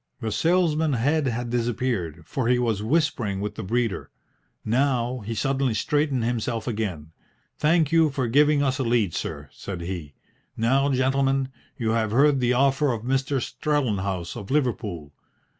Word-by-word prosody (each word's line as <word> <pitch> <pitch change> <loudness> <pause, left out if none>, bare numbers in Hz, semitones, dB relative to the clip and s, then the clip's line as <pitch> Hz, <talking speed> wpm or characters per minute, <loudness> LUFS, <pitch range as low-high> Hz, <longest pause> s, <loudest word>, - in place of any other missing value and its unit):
The 110 -3 -3
salesman's 160 -4 +2
head 145 +4 +1
had 120 0 -2
disappeared, 115 -9 -1
for 130 - -2
he 125 0 +4
was 115 -4 0
whispering 115 -6 0
with 105 +1 -3
the - - -6
breeder. 115 +2 -1 0.6
Now 125 +1 +1
he 115 +1 -5
suddenly 135 -2 0
straightened 145 -2 0
himself 115 -1 -2
again. 95 -10 -3 0.5
"Thank 155 -1 +3
you 165 -2 +4
for 135 -3 -2
giving 145 +4 +4
us 135 0 0
a - - +1
lead, 115 -7 +1
sir," 70 0 -4
said 95 -3 -7
he. 85 -5 -6 0.4
"Now, 135 +5 +2
gentlemen, 135 0 +1 0.3
you 115 -4 0
have 110 -1 +1
heard 140 +5 +4
the 125 0 +2
offer 135 +2 +3
of 115 -2 -4
Mr. 135 +2 0
Strellenhaus 105 - -1
of 100 - -8
Liverpool. 110 - -1
125 Hz, 155 wpm, -25 LUFS, 110-140 Hz, 0.6 s, he